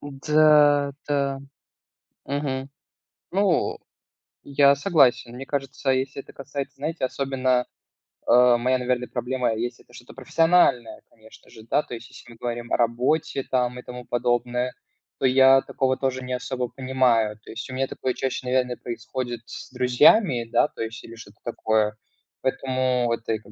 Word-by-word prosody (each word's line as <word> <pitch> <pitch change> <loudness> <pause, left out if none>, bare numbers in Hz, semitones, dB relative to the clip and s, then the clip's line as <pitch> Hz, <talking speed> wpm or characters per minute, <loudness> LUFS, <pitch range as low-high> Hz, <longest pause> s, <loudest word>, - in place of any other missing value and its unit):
Да, 145 0 +3 0.2
да, 140 -2 0 0.9
мгм. 135 -2 -3 0.6
Ну, 190 -2 +1 0.7
я 140 0 +4
согласен. 135 -7 +2
Мне 135 +2 -7
кажется, 135 -1 -2
если 130 +1 -2
это - - -17
касается, 140 0 -6
знаете, 150 +1 -3
особенно, 130 -1 0 0.6
э, 125 0 +6
моя, 130 +2 +1
наверное, 125 0 -1
проблема 125 -1 -1
есть- 120 +2 -4
это - - -24
что-то 120 0 -13
профессиональное, 165 -8 +2
конечно 110 0 -19
же, 110 - -14
да, 120 +6 +1
то - - -10
есть 115 -1 -8
если 120 - -14
мы 115 - -15
говорим 120 0 -5
о - - +2
работе 125 +4 0
там 125 -1 -1
и - - -10
тому 125 0 -9
подобное, 120 +1 -1 0.5
то - - 0
я 135 +1 +6
такого 130 -1 -1
тоже 130 -1 -2
не 125 0 -4
особо 125 0 -3
понимаю. 125 -5 +1
То - - -11
есть 115 +3 -7
у - - -7
меня 135 +1 -1
такое 130 - -3
чаще, 130 0 -3
наверное, 125 -1 0
происходит 120 0 -5
с 140 - -10
друзьями, 125 - +4
да, - - +4
то - - -10
есть 115 0 -5
или 115 - -11
что-то 115 - -14
такое, 110 -1 0 0.5
поэтому 130 -2 0
это, 115 -1 -2
как 105 - -18
130 Hz, 155 wpm, -24 LUFS, 120-135 Hz, 0.9 s, э